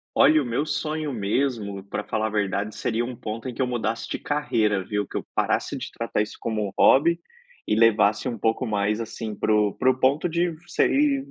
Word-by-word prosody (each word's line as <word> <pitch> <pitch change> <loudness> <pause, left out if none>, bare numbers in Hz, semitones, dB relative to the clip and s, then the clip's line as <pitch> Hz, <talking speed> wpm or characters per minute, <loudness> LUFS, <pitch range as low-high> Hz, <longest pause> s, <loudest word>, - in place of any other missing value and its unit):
Olha, 155 -1 +6
o - - -5
meu 120 +5 -1
sonho 155 0 -2
mesmo, 105 -3 -1
pra 105 - -4
falar 110 +1 -1
a - - -2
verdade, 100 0 -1
seria 115 0 -1
um 125 +1 -5
ponto 110 +1 -6
em 125 - -5
que 130 - -1
eu - - +2
mudasse 115 -2 -2
de - - -3
carreira, 110 -9 0
viu? 105 +1 -2
Que - - -8
eu - - -3
parasse - - 0
de - - -5
tratar 115 -2 -2
isso 105 - -3
como 110 -2 -1
um 95 - -6
hobby 170 +5 +5 0.5
e 105 - +1
levasse 110 +1 +3
um 120 - -3
pouco 115 +4 0
mais, 105 0 0
assim, 110 -1 -5
pro 105 -2 +1
pro 130 0 +3
ponto 140 +6 +2
de 170 +1 0 0.2
ser 285 0 +3
115 Hz, 205 wpm, -24 LUFS, 105-135 Hz, 0.5 s, Olha